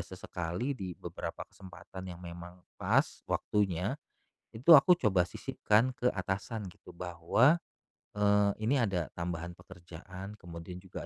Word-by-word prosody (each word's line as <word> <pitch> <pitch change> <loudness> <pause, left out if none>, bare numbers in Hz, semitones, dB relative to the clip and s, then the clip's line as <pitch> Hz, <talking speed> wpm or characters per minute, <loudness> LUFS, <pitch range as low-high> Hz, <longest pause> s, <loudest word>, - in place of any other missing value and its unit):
sesekali 90 +5 -4
di 95 -9 -6
beberapa - - -6
kesempatan 95 0 -10
yang 90 -1 -8
memang 85 +1 -9 0.2
pas, - - +2
waktunya, 100 - 0 0.6
itu 125 +9 +1
aku 165 +4 +9
coba 95 - +2
sisipkan 115 +5 +1
ke 125 0 +1
atasan 100 +3 -3
gitu - - -15
bahwa, 90 - +3 0.6
eee, 105 0 +4
ini 135 +4 +3
ada 95 -7 -1
tambahan 85 0 -4
pekerjaan, 90 +2 -10
kemudian 85 +1 -8
juga 95 -1 -8
95 Hz, 125 wpm, -31 LUFS, 90-105 Hz, 0.6 s, aku